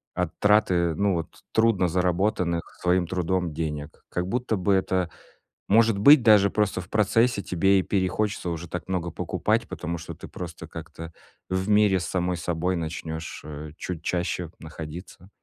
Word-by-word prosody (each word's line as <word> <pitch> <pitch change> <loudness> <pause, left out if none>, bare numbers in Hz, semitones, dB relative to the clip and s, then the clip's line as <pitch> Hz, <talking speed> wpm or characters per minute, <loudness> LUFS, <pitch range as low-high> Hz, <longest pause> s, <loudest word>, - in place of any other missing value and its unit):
от 90 -2 0
траты, 90 -6 +3
ну 100 +1 +2
вот 85 -1 -2 0.3
трудно 110 -5 +3
заработанных 90 0 +1 0.2
своим 90 -1 +2
трудом 90 -1 -1
денег. 75 -2 -5
Как 90 - -2
будто 120 0 -1
бы 95 +2 +2
это, 95 -2 +1 0.6
может 110 0 +5
быть, 140 +3 +8
даже 105 -3 +6
просто 105 -3 0
в 85 - -14
процессе 110 +1 +2
тебе 95 +2 +3
и - - 0
перехочется 95 -1 -1
уже 85 0 -4
так 90 +2 -6
много 85 -3 -2
покупать, - - -1
потому 85 +1 -4
что 80 - -7
ты - - -10
просто - - -8
как-то 85 0 -9 0.4
в 95 +2 -1
мире 105 -2 +4
с - - -3
самой 90 -1 -1
собой 85 +2 -1
начнёшь, 80 -1 -5
э, 75 0 -7
чуть 85 -3 -5
чаще 90 -1 -2
находиться. 80 +3 -9
90 Hz, 160 wpm, -25 LUFS, 85-100 Hz, 0.6 s, быть